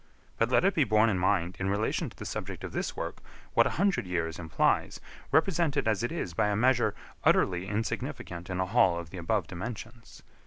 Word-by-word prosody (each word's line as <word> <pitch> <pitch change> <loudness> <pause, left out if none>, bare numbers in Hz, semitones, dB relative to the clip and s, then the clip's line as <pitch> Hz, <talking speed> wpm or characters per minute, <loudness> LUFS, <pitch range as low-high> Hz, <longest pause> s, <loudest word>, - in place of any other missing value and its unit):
But 115 - +3
let 130 - +3
it 195 - +4
be 155 - +3
borne 110 -1 +4
in 95 - 0
mind, 90 -1 +1
in 95 +1 -1
relation 100 +2 0
to - - -18
the - - -7
subject - - -5
of - - -5
this - - -3
work, - - -4 0.3
what - - +5
a - - -4
hundred 185 - +1
years 85 -2 -2
implies, 80 -3 +1 0.3
represented 160 -5 +2
as 110 -2 +2
it 120 - -1
is 160 - -3
by 105 - +2
a 105 - +1
measure 120 -2 +3 0.3
utterly 90 0 +3
insignificant 95 -4 -4
in 90 0 -2
a 95 - +2
hall 95 -4 +3
of 85 -2 -7
the 95 - -6
above 95 +2 0
dimensions. 110 +6 -8
105 Hz, 205 wpm, -29 LUFS, 90-120 Hz, 0.3 s, what